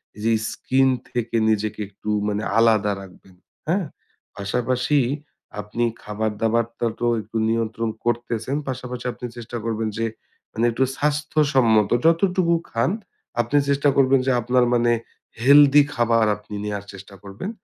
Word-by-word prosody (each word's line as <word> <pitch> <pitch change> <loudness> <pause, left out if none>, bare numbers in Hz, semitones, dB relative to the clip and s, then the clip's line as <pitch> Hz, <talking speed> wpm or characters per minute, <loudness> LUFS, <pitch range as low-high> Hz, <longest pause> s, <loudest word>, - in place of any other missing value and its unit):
এই 105 - -11
যে 115 - +3 0.2
স্ক্রীন 135 0 +1 0.2
থেকে 115 -1 -3
নিজেকে 110 0 -1
একটু 100 +1 -8 0.2
মানে 105 +1 -1
আলাদা 110 -3 +4
রাখবেন, 95 -1 -15 0.3
হ্যাঁ? 180 +3 +1 0.5
পাশাপাশি 125 +8 0 0.6
আপনি 110 +3 -3 0.2
খাবার-দাবারটা 110 +2 -1
তো - - -1 0.2
একটু 110 +1 -6
নিয়ন্ত্রণ 115 0 -1 0.2
করতেছেন। 120 +2 -1
পাশাপাশি 125 -1 -5
আপনি - - -8
চেষ্টা 120 0 -6
করবেন 115 -1 -1
যে 115 - 0 0.5
মানে 115 - 0
একটু 115 +3 +1
স্বাস্থ্যসম্মত 145 -7 +2 0.2
যতটুকু 170 +1 +3 0.2
খান 115 +8 +1 0.5
আপনি 120 +5 0
চেষ্টা 140 +1 +3
করবেন 135 0 +5
যে - - +4
আপনার 125 +2 +2
মানে 120 0 +3 0.5
হেলদি 145 +2 +7
খাবার 115 -2 +2
আপনি 105 0 -10
নেয়ার 100 -1 -4
চেষ্টা 100 +1 -12
করবেন। 100 - -6
115 Hz, 135 wpm, -22 LUFS, 110-135 Hz, 0.6 s, হেলদি